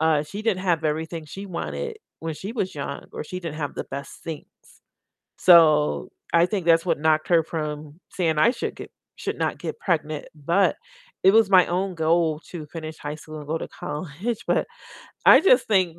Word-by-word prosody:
uh, 160 Hz, -2 st, +3 dB
she 195 Hz, +8 st, -7 dB
didn't 195 Hz, -5 st, 0 dB
have 170 Hz, -4 st, +1 dB
everything 160 Hz, +1 st, -2 dB
she 195 Hz, +7 st, -8 dB
wanted 200 Hz, -, -4 dB, 0.2 s
when 160 Hz, -1 st, -4 dB
she 195 Hz, +7 st, -6 dB
was 195 Hz, -6 st, -2 dB
young, 140 Hz, -, -5 dB
or -, -, -5 dB
she 180 Hz, +4 st, -6 dB
didn't 165 Hz, -3 st, -6 dB
have 145 Hz, -3 st, -3 dB
the -, -, -3 dB
best 140 Hz, +1 st, -8 dB
things. 160 Hz, -3 st, -6 dB, 0.9 s
So, 155 Hz, -4 st, +5 dB, 0.2 s
I 170 Hz, 0 st, +6 dB
think 190 Hz, -3 st, -2 dB
that's 165 Hz, +1 st, +5 dB
what 175 Hz, -, 0 dB
knocked 155 Hz, +1 st, +2 dB
her 165 Hz, -2 st, +5 dB
from 150 Hz, -1 st, -5 dB
saying, 165 Hz, -4 st, 0 dB
"I 235 Hz, -, +5 dB
should -, -, -4 dB
get -, -, -10 dB, 0.3 s
should -, -, -4 dB
not -, -, -1 dB
get -, -, -5 dB
pregnant." 155 Hz, -4 st, -1 dB
But 170 Hz, +6 st, +2 dB, 0.5 s
it 190 Hz, -, +6 dB
was 220 Hz, -2 st, +5 dB
my 185 Hz, -2 st, +7 dB
own 185 Hz, +1 st, -1 dB
goal 160 Hz, -1 st, +2 dB
to 165 Hz, -4 st, -6 dB
finish 160 Hz, 0 st, -7 dB
high 145 Hz, +1 st, -5 dB
school, 155 Hz, 0 st, -10 dB
and 145 Hz, -, -10 dB
go 160 Hz, +2 st, -1 dB
to -, -, -5 dB
college. 175 Hz, +7 st, -5 dB
But -, -, +1 dB, 0.6 s
I -, -, +9 dB
just 255 Hz, -9 st, +4 dB
think 185 Hz, -5 st, +2 dB
165 Hz, 195 wpm, -24 LUFS, 155-185 Hz, 0.9 s, I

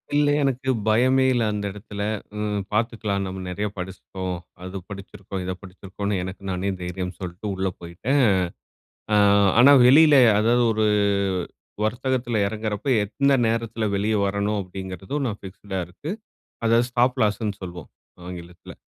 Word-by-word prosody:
இல்லே, 145 Hz, 0 st, +4 dB
எனக்கு 130 Hz, -1 st, -1 dB, 0.2 s
பயமே 130 Hz, +4 st, +4 dB
இல்ல 120 Hz, -2 st, +1 dB
அந்த 105 Hz, -1 st, -3 dB
இடத்துல. 105 Hz, 0 st, -8 dB, 0.3 s
ஹ்ம் 105 Hz, -1 st, -1 dB
பாத்துக்கலாம் 110 Hz, -3 st, -1 dB
நம்ம 95 Hz, 0 st, -5 dB
நெறைய 105 Hz, +3 st, -2 dB
படிச்சிட்டோம், 95 Hz, 0 st, -5 dB, 0.3 s
அது 95 Hz, +1 st, -6 dB
படிச்சிருக்கோம், 100 Hz, -1 st, -7 dB
இத 95 Hz, -, -2 dB
படிச்சிருக்கோம்னு, 95 Hz, +2 st, -5 dB
எனக்கு 95 Hz, +1 st, -7 dB
நானே 95 Hz, +2 st, -1 dB
தைரியம் 90 Hz, +1 st, -4 dB
சொல்லிட்டு 90 Hz, +3 st, -6 dB
உள்ள 95 Hz, 0 st, -1 dB
போயிட்டேன். 100 Hz, +12 st, -1 dB, 0.9 s
அ -, -, +5 dB, 0.4 s
ஆனா 140 Hz, +4 st, +8 dB
வெளியில 150 Hz, +3 st, +7 dB, 0.2 s
அதாவது 120 Hz, +2 st, +3 dB
ஒரு 110 Hz, 0 st, +1 dB, 1.0 s
வர்த்தகத்துல 120 Hz, 0 st, -1 dB
இறங்குறப்போ 110 Hz, +4 st, -3 dB
எந்த 140 Hz, +7 st, +1 dB
நேரத்துல 115 Hz, -1 st, -1 dB
வெளியே 105 Hz, +2 st, +1 dB
வரணும் 100 Hz, +1 st, -1 dB
அப்படிங்கிறதும் 95 Hz, +8 st, -5 dB
நான் 105 Hz, -2 st, -4 dB
ஃபிக்ஸ்டா 95 Hz, 0 st, -6 dB
இருக்கு. 95 Hz, -, -9 dB, 0.6 s
அதாவது 115 Hz, +1 st, +4 dB
ஸ்டாப் 125 Hz, +2 st, +2 dB
லாஸ்னு 105 Hz, -1 st, 0 dB
சொல்வோம் 90 Hz, -3 st, -8 dB, 0.4 s
ஆங்கிலத்துல. 90 Hz, -1 st, -10 dB
105 Hz, 130 wpm, -24 LUFS, 95-120 Hz, 1.0 s, ஆனா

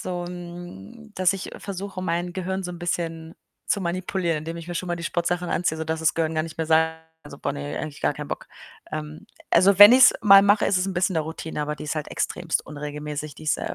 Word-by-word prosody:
so 175 Hz, -1 st, -4 dB
'n 175 Hz, -, -9 dB
dass 185 Hz, 0 st, +3 dB
ich 195 Hz, -, -6 dB
versuche, 195 Hz, -1 st, -6 dB
mein 175 Hz, 0 st, -2 dB
Gehirn 190 Hz, +1 st, -3 dB
so 180 Hz, -, -5 dB
'n 175 Hz, -, -8 dB
bisschen 165 Hz, -1 st, -3 dB, 0.3 s
zu 200 Hz, -, +1 dB
manipulieren, 175 Hz, -2 st, -1 dB
indem 165 Hz, +2 st, -6 dB
ich 170 Hz, +1 st, -9 dB
mir 175 Hz, -, -3 dB
schon 180 Hz, -, -4 dB
mal 175 Hz, -, -1 dB
die 170 Hz, -, -7 dB
Sportsachen 175 Hz, 0 st, -1 dB
anziehe, 170 Hz, -2 st, 0 dB
sodass 160 Hz, 0 st, -3 dB
das 160 Hz, -1 st, +1 dB
Gehirn 160 Hz, -1 st, -1 dB
gar 155 Hz, -, +1 dB
nicht 165 Hz, -1 st, -9 dB
mehr 160 Hz, -1 st, -3 dB
sagt: 160 Hz, 0 st, +3 dB, 0.3 s
„So, 140 Hz, -1 st, -10 dB
boah -, -, -2 dB
ne, 145 Hz, +1 st, -5 dB
eigentlich 150 Hz, -2 st, -7 dB
gar -, -, +1 dB
kein -, -, -7 dB
Bock.“ -, -, -5 dB, 0.5 s
Ähm, 155 Hz, 0 st, -6 dB, 0.2 s
also, 190 Hz, +3 st, +5 dB
wenn 205 Hz, -, +13 dB
ich's 255 Hz, +1 st, +8 dB
mal 195 Hz, -2 st, +9 dB
mache, 205 Hz, +2 st, +3 dB
ist 195 Hz, -, +2 dB
es 185 Hz, -, 0 dB
'n 195 Hz, -, -3 dB
bisschen 180 Hz, +1 st, +1 dB
'ne 160 Hz, -, +2 dB
Routine, 160 Hz, 0 st, -5 dB
aber 150 Hz, 0 st, -2 dB
die -, -, -10 dB
ist 155 Hz, +1 st, -3 dB
halt 155 Hz, -, -3 dB
extrem 175 Hz, -2 st, -1 dB
unregelmäßig. 150 Hz, 0 st, -6 dB
Die -, -, -13 dB
ist, 155 Hz, -, +1 dB
äh, -, -, -4 dB
170 Hz, 240 wpm, -24 LUFS, 155-185 Hz, 0.5 s, wenn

